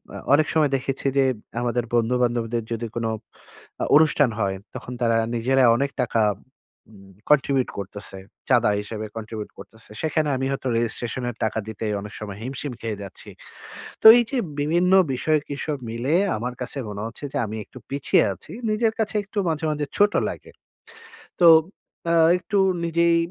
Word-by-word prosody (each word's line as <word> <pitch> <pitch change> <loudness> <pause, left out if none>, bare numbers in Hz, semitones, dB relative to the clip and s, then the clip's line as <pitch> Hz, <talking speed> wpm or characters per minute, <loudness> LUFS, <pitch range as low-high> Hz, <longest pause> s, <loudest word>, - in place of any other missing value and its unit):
অ - - -5 0.2
অনেক 155 +2 +4
সময় 150 -3 +3
দেখেছি 135 +1 -3
যে 135 - +5 0.4
আমাদের 120 0 0
বন্ধুবান্ধবদের 120 -1 0
যদি 115 +1 -3
কোনো 115 -1 -1 0.7
আ - - +1
অনুষ্ঠান 150 -3 +5
হয়, 95 -2 0 0.2
তখন 125 - -7
তারা 115 -1 +3 0.2
নিজেরা 130 +3 +2
অনেক 140 +1 -1
টাকা 115 -2 +1 0.7
উম 100 -2 -16 0.2
কন্ট্রিবিউট 140 -3 +3
করতেছে। 100 0 -8 0.3
চাঁদা - - +4
হিসেবে 110 +1 -6
কন্ট্রিবিউট 110 -1 -6
করতেছে। 110 +3 -14
সেখানে 155 -1 0
আমি 130 +1 -2
হয়তো 135 -1 -3
রেজিস্ট্রেশনের 120 +1 -3
টাকা 110 0 0
দিতেই 110 -1 -3
অনেক 105 0 -9
সময় 100 -2 -7
হিমশিম 130 +1 -5
খেয়ে 110 -3 -4
যাচ্ছি। 100 - -11 0.7
তো - - -13
এই 240 - +4
যে 270 - -1 0.2
বিভিন্ন 170 +5 +2 0.2
বিষয়ে 155 +4 +1
কি 145 - -4
সব 150 -2 -2
মিলে 125 +7 -1 0.2
আমার 125 +3 -4
কাছে 125 - -5
মনে 105 0 -6
হচ্ছে 115 +5 -12
যে - - -1
আমি 110 +1 -6
একটু - - -15
পিছিয়ে 140 0 +2
আছি। - - -13 0.2
নিজের 220 +1 +1
কাছে 215 0 -1
একটু 205 +1 -13
মাঝে, 160 0 -2
মাঝে 150 -1 -2
ছোট 205 0 +4 0.2
লাগে। - - -9 0.9
তো 170 - +6 0.6
অ্যা 170 0 +2 0.2
একটু 200 +2 -2 0.3
নিজেই 170 0 +3
125 Hz, 160 wpm, -23 LUFS, 110-150 Hz, 0.9 s, তো